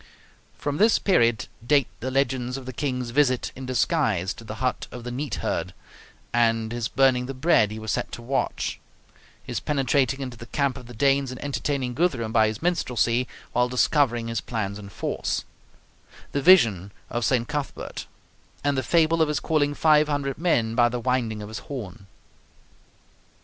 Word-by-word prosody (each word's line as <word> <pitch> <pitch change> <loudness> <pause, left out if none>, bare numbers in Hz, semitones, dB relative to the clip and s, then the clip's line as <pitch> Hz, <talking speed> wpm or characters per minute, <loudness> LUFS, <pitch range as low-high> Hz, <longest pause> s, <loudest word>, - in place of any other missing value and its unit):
From 145 0 -2
this 215 +3 +5
period 120 - +2 0.2
date 140 +1 +3
the 130 - -3
legends 130 -1 0
of 135 - -9
the 130 - -6
King's 125 -3 -2
visit 130 -2 +2
in 130 0 -7
disguise 120 - +1
to - - -12
the 110 -1 -7
hut 125 +2 -2
of 125 - -8
the 120 - -5
neat 140 +4 -3
herd, - - -2 0.6
and 115 -1 +2
his 120 -1 -2
burning 130 -2 +2
the 135 - -5
bread 130 -6 +3
he 110 - -6
was 110 -1 -4
set - - -2
to - - -6
watch; 135 +3 -2 0.6
his - - -3
penetrating 135 -1 +1
into 125 -3 -6
the 120 - -10
camp 140 +1 0
of 125 -3 -10
the 120 - -11
Danes 140 +1 +2
and 130 -1 -7
entertaining 140 -2 -2
Guthrum 125 -7 0
by 110 -1 +5
his 110 +6 -5
minstrelsy 125 -8 +1 0.2
while 125 +1 +2
discovering 125 -2 +2
his 115 -1 -2
plans 105 -3 -3
and 100 -1 -10
force; - - -2 0.9
the 140 - -1
vision 115 - +5 0.2
of 120 - -1
St. 120 +1 +1
Cuthbert; 145 -2 -5 0.6
and 145 0 +1
the 130 - +1
fable 165 +2 +3
of 160 - +4
his 150 -1 0
calling 145 -2 +1
five 155 -1 +4
hundred 145 -2 -2
men 120 -10 +1
by 120 0 +4
the 120 +1 -3
winding 115 -4 -1
of - - -7
his 110 0 -6
horn. 105 -7 -8
125 Hz, 175 wpm, -25 LUFS, 115-140 Hz, 0.9 s, this